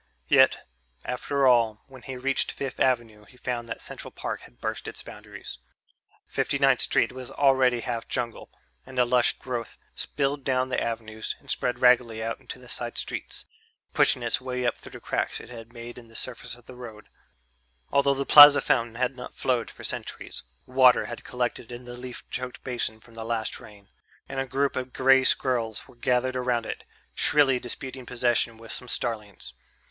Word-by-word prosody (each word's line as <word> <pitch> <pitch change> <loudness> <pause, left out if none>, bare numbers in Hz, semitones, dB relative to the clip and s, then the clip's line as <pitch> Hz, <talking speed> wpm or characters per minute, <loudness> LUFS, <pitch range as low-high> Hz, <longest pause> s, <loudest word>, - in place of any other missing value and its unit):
Yet, - - +5 0.4
after 135 +2 0
all, 115 -4 +4
when 130 -2 -14
he 130 0 -7
reached 135 +2 0
Fifth 135 -2 -5
Avenue 115 -5 +1
he 125 - -19
found 120 -2 -3
that - - -6
Central - - -8
Park - - -5
had - - -17
burst - - -4
its - - -7
boundaries. - - -10 0.7
Fifty - - 0
ninth - - +4
Street - - +2
was 130 -1 -7
already 130 -3 +3
half 115 -1 -4
jungle, 120 -2 -3 0.3
and 130 0 -12
the 125 - +5
lush 120 0 +3
growth 120 -3 -5 0.2
spilled 140 0 -1
down 130 -1 +1
the 130 - 0
avenues 110 -1 -3
and - - -7
spread 125 -1 0
raggedly 120 -3 +4
out 115 0 -3
into - - -7
the - - -15
side - - -4
streets, - - -4 0.5
pushing 125 - +3
its 120 +4 +1
way 125 -1 -3
up 120 - +2
through - - -13
the - - -8
cracks - - -2
it 115 - -12
had 115 -1 -10
made 120 0 -9
in 120 - -15
the 115 - -19
surface 125 -1 -4
of 120 -1 -19
the 130 - -11
roads. 115 -4 -10 0.8
Although 140 0 +3
the 140 +1 -2
Plaza 145 -1 +11
fountain 115 -2 +1
had 125 +2 0
not 125 - -9
flowed 125 -3 0
for - - -13
centuries, - - -5 0.2
water 130 -1 +5
had 120 - -7
collected 125 -1 -3
in 120 +1 -8
the 120 - -8
leaf 125 0 -8
choked 125 0 -5
basin 120 -3 -3
from 115 - -18
the 115 0 -6
last 115 -1 -2
rain, 105 -4 -15 0.4
and 135 - -4
a 135 - -1
group 140 +2 0
of 130 0 -4
grey 135 0 +5
squirrels 120 -5 0
were - - -17
gathered 125 +1 +1
around 125 -2 0
it, - - -6 0.3
shrilly 135 -4 +4
disputing 130 +1 -6
possession 120 -2 +1
with 115 0 -11
some 125 - -5
starlings. 110 -4 -3
125 Hz, 185 wpm, -26 LUFS, 115-130 Hz, 0.8 s, Plaza